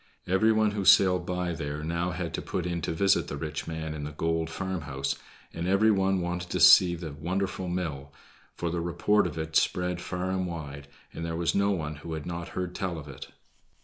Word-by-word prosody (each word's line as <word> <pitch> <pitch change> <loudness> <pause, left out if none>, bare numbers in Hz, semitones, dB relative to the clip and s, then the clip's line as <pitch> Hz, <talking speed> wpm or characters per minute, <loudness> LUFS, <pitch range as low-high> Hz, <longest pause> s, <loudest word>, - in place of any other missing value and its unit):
Every 95 +5 +3
one 110 -1 +3
who 105 -1 -2
sailed 90 -2 +5
by 90 -1 -1
there 75 -1 -4
now 85 +2 -1
had 90 -1 -4
to - - -2
put 90 - -3
in 85 -1 -2
to 80 - -2
visit 95 +3 +2
the 70 - -5
rich 75 +1 -4
man 80 -1 -4
in 75 -1 -5
the 75 - -4
gold 80 +2 -1
farmhouse, 80 -7 -3 0.4
and 85 +1 -3
every 100 +4 +4
one 95 -2 +2
wanted 90 0 -3
to - - -1
see 90 -2 +8
the 85 -2 -6
wonderful 95 +5 -2
mill, 80 -6 -3 0.4
for 85 -1 -2
the 85 0 -1
report 90 +4 +2
of 80 -2 -7
it 80 0 -4
spread 90 +1 +1
far 90 0 -3
and 95 -1 -1
wide, 70 -4 -7 0.3
and 80 - -6
there 85 0 -3
was 85 0 0
no 100 0 +2
one 75 -6 -2
who 80 +1 -7
had 80 -2 -5
not 85 0 -4
heard 90 -1 -2
tell 95 -4 -3
of 75 -2 -8
it. 70 - -9
85 Hz, 215 wpm, -28 LUFS, 80-95 Hz, 0.4 s, see